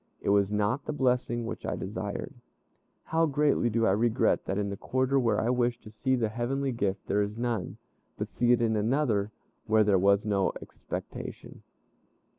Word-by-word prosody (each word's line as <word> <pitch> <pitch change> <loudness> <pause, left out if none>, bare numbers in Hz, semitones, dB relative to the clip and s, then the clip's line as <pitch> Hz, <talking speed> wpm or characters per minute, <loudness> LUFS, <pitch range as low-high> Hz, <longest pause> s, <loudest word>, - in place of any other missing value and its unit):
It - - -2
was 100 0 +3
not 105 +7 0
the 155 - -3
blessing 125 -4 0
which - - -6
I - - -2
desired. - - -5 0.7
How 165 +1 +1
greatly 145 -4 +2
do 115 0 +1
I 95 - +4
regret 110 +3 +2
that 95 - -2
in 100 -1 -1
the - - -3
quarter 130 +6 0
where 120 -3 +2
I 120 - +1
wished 120 -1 0
to 110 - -11
see 130 +4 0
the 115 -3 0
heavenly 130 +4 -1
gift, 100 -5 -2
there 105 - +1
is 105 +2 -3
none, 120 -1 -2 0.4
but - - -4
see 120 0 +2
it 120 -1 +4
in 110 -1 +2
another, 110 -2 +1 0.4
where 110 0 +4
there 100 -2 +3
was 100 +2 +3
no 100 -3 +1
expectation. - - -8
115 Hz, 185 wpm, -28 LUFS, 105-125 Hz, 0.7 s, I